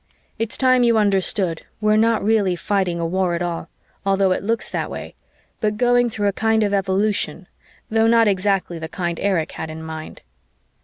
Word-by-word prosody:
It's 225 +1 -1
time 255 -1 +4
you 235 -2 +4
understood 195 -4 +1 0.2
we're 215 0 +3
not 225 0 +2
really 205 -4 +2
fighting 185 -2 -1
a 170 - -1
war 180 0 0
at 170 - -2
all, 170 -1 -4 0.3
although 195 -1 +2
it - - 0
looks 225 +2 -1
that - - -2
way, - - -7 0.5
but 210 -1 -1
going 245 0 +3
through 205 -2 -1
a 200 - +1
kind 220 +1 +2
of 205 -1 0
evolution, 195 -3 0 0.4
though 225 0 +2
not 230 -1 +5
exactly 190 -3 0
the 160 0 -6
kind 170 -1 -3
Erich 180 -5 0
had 160 - -6
in 160 0 -7
mind. 160 0 -8
200 Hz, 185 wpm, -21 LUFS, 175-220 Hz, 0.5 s, not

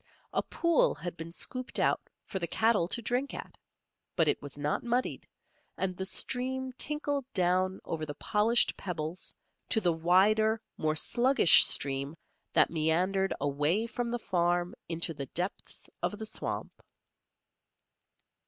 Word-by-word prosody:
A - - +2
pool 335 -2 +2
had 175 0 -6
been 165 0 -8
scooped 255 +8 -3
out - - +2 0.2
for 190 - -4
the 170 - -2
cattle 220 -1 +2
to 235 +5 -3
drink 250 +5 -1
at; - - -8 0.6
but 165 -3 +3
it - - +1
was 145 0 -6
not 145 +1 -1
muddied, 240 +1 -1 0.5
and 185 -1 -2
the 190 +1 -2
stream 260 +3 0
tinkled 290 +1 -1
down 185 +1 +2
over 160 -2 -4
the 145 -1 -5
polished 215 +3 +2
pebbles 170 -1 -3 0.3
to 220 - +3
the 175 -5 +1
wider, 205 +7 +3 0.2
more 155 0 0
sluggish 240 - +6
stream 140 +2 -1 0.4
that - - +4
meandered 180 +4 +1
away 150 +9 +1
from 235 +1 -3
the 240 - -1
farm 175 -4 0 0.2
into 165 0 -1
the 140 -3 -6
depths 180 +8 -4
of 210 - -2
the 220 - -5
swamp. - - -5
185 Hz, 145 wpm, -30 LUFS, 165-235 Hz, 0.6 s, sluggish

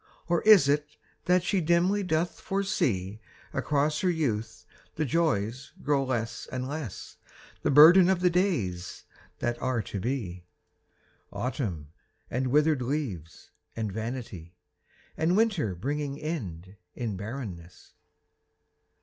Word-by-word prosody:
Or 170 -1 +2
is 210 -9 +7
it 150 +1 0 0.3
that 180 0 +3
she 190 0 +1
dimly 175 +5 +2
doth 175 -2 -1
foresee 110 - -1 0.3
Across 150 +1 0
her 185 - +1
youth 115 -10 -2 0.3
the 155 - 0
joys 130 -5 -1
grow 140 -1 +2
less 120 -4 -3
and 130 0 -3
less 145 -7 -6 0.4
The - - 0
burden 170 +6 +8
of 190 -2 +2
the 180 -1 +4
days 115 - -1 0.3
that 120 0 -2
are 130 -4 0
to 100 - -5
be: 100 -7 -3 0.9
Autumn 100 - -3 0.4
and 130 +2 0
withered 150 +1 +3
leaves 120 - -4 0.2
and 110 -3 -3
vanity, 110 -6 -6 0.6
And 170 +4 +1
winter 195 - +1
bringing 140 - -3
end 100 - -5 0.2
in 115 -5 -3
barrenness. 95 -5 -8
135 Hz, 120 wpm, -28 LUFS, 105-160 Hz, 0.9 s, burden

